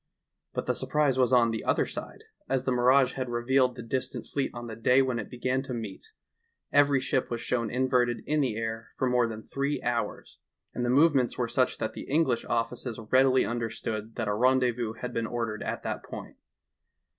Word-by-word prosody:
But -, -, -3 dB
the -, -, +1 dB
surprise 145 Hz, -4 st, +1 dB
was 125 Hz, -1 st, +3 dB
on 120 Hz, -2 st, +5 dB
the 110 Hz, -, -3 dB
other -, -, +2 dB
side, -, -, -7 dB, 0.3 s
as 130 Hz, -1 st, +1 dB
the 130 Hz, -, 0 dB
mirage 125 Hz, +2 st, +4 dB
had 130 Hz, -2 st, -3 dB
revealed 125 Hz, +2 st, +2 dB
the -, -, -7 dB
dis 130 Hz, +3 st, -2 dB
tant -, -, -7 dB
fleet 140 Hz, -2 st, -2 dB
on 120 Hz, 0 st, -7 dB
the 115 Hz, -2 st, -6 dB
day 125 Hz, +4 st, +4 dB
when 130 Hz, -3 st, -1 dB
it 105 Hz, -, -6 dB
began 130 Hz, +1 st, -1 dB
to 135 Hz, -2 st, -5 dB
meet; 110 Hz, -5 st, -6 dB, 0.7 s
every 145 Hz, -1 st, +5 dB
ship 130 Hz, 0 st, -1 dB
was 120 Hz, -, -2 dB
shown 115 Hz, -1 st, -1 dB
inverted 125 Hz, -1 st, +1 dB
in 150 Hz, 0 st, +1 dB
the 125 Hz, -6 st, 0 dB
air 115 Hz, -1 st, -4 dB
for 130 Hz, -, +1 dB
more 125 Hz, -1 st, +3 dB
than 110 Hz, -1 st, -7 dB
three 140 Hz, +1 st, -2 dB
hours, 120 Hz, -1 st, -3 dB, 0.3 s
and 120 Hz, -, -2 dB
the 120 Hz, -, 0 dB
movements 135 Hz, -2 st, +4 dB
were -, -, 0 dB
such -, -, +1 dB
that -, -, -3 dB
the -, -, -8 dB
English 140 Hz, -5 st, +2 dB
offices 120 Hz, 0 st, -2 dB
readily 130 Hz, 0 st, +5 dB
understood 115 Hz, -1 st, -4 dB
that -, -, -2 dB
a 105 Hz, -, +1 dB
ren 130 Hz, +5 st, +4 dB
dezvous 120 Hz, -3 st, -1 dB
had 125 Hz, -1 st, -4 dB
been 115 Hz, 0 st, -1 dB
ordered 115 Hz, -3 st, -3 dB
at -, -, -4 dB
that -, -, -3 dB
point. -, -, -9 dB
125 Hz, 205 wpm, -28 LUFS, 115-130 Hz, 0.7 s, on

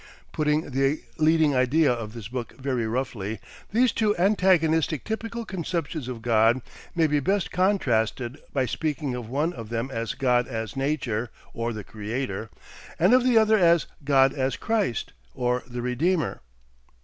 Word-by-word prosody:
Putting 150 Hz, 0 st, 0 dB
the 135 Hz, +3 st, +1 dB, 0.2 s
leading 155 Hz, -2 st, +4 dB
idea 130 Hz, +2 st, +3 dB
of 110 Hz, -3 st, -6 dB
this 115 Hz, -4 st, -7 dB
book 120 Hz, 0 st, -6 dB
very 130 Hz, -4 st, -1 dB
roughly, 110 Hz, -4 st, -3 dB, 0.3 s
these 240 Hz, +2 st, +3 dB
two 210 Hz, -1 st, +1 dB
antagonistic 170 Hz, -6 st, +3 dB
typical 230 Hz, +1 st, -4 dB
conceptions 170 Hz, -, -3 dB
of 120 Hz, -3 st, -6 dB
God 115 Hz, +2 st, +3 dB, 0.3 s
may 165 Hz, -2 st, +3 dB
be 150 Hz, -1 st, +2 dB
best 195 Hz, +6 st, 0 dB
contrasted 130 Hz, -, +1 dB
by 130 Hz, -2 st, +1 dB
speaking 145 Hz, +1 st, -2 dB
of 120 Hz, -3 st, -6 dB
one 150 Hz, +7 st, 0 dB
of 115 Hz, -3 st, -8 dB
them 120 Hz, +3 st, -3 dB
as 115 Hz, 0 st, -3 dB
God 125 Hz, -2 st, +2 dB
as 115 Hz, -4 st, -4 dB
Nature 130 Hz, -5 st, -1 dB, 0.2 s
or 115 Hz, +1 st, -2 dB
the 110 Hz, -2 st, -6 dB
Creator, 110 Hz, +1 st, -4 dB, 0.5 s
and 185 Hz, +7 st, +4 dB
of 255 Hz, -1 st, +6 dB
the 250 Hz, -2 st, +4 dB
other 220 Hz, -1 st, +5 dB
as 170 Hz, -2 st, +4 dB, 0.2 s
God 135 Hz, -1 st, +4 dB
as 130 Hz, -2 st, -1 dB
Christ 210 Hz, -, -1 dB, 0.2 s
or 125 Hz, 0 st, 0 dB
the 120 Hz, -1 st, -5 dB
Redeemer. 155 Hz, +8 st, 0 dB
135 Hz, 155 wpm, -25 LUFS, 120-170 Hz, 0.5 s, of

